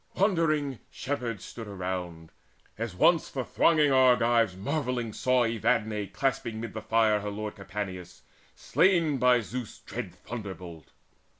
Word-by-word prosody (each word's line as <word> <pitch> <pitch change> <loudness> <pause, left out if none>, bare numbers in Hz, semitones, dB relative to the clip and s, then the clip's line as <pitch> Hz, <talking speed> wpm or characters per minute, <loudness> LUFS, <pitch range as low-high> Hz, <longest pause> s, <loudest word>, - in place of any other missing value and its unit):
Wondering 155 - +1 0.3
herdmen 125 -5 -2
stood 110 +4 -9
around, 90 -4 -5 0.4
As 110 -4 -4
once 170 - +4
the 130 -3 -4
thronging 155 -3 +3
Argives 120 -6 +4
marvelling 125 -2 -2
saw 125 -1 +2
Evadne 110 -2 0
clasping 115 -1 -2
mid 115 -2 -6
the 110 - -5
fire 110 -1 +3
her 105 0 -4
lord 105 +1 -5
Capaneus, 95 -2 -6 0.3
slain 165 -6 +2
by 125 -1 +5
Zeus' 115 +2 -6
dread - - -7
thunderbolt. 95 -8 -8
115 Hz, 125 wpm, -28 LUFS, 100-130 Hz, 0.4 s, by